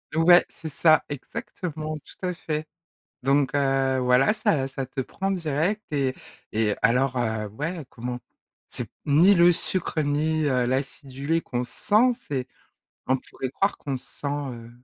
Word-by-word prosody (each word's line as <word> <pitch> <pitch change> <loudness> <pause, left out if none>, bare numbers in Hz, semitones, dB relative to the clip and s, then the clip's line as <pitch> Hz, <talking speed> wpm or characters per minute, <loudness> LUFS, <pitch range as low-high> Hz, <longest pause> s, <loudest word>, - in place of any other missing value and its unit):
Ouais 175 +2 +7
c'est 160 - -8
ça, 155 +2 +5
exactement, 155 - -5
tout 150 +5 -10
à 180 - -1
fait, 155 -3 -4 0.5
donc 135 +1 +2
heu, 135 -2 +2
voilà, 125 +7 +4
ça 140 -10 +1
ça 135 -1 -5
te 135 +1 -3
prend 195 +9 -3
direct 180 +3 0
et 135 -3 0 0.4
et 110 -1 +1
alors, 125 +2 +3
heu, 110 -3 -1
ouais 150 - -4
comment. 125 +1 -5 0.5
C'est - - -5 0.2
ni 170 +8 +6
le 175 0 +6
sucre, 175 -2 -1
ni, 155 +2 +1
heu, 125 -3 +2
l'acidulé 135 +4 -2
qu'on 125 -4 -3
sent 215 - +2
c'est 135 - -4 0.6
on 130 - +4
pourrait 130 0 -6
croire 195 +8 0
qu'on 140 -2 -3
sent, 140 - -8
heu, 135 -5 -4
145 Hz, 150 wpm, -25 LUFS, 130-165 Hz, 0.6 s, Ouais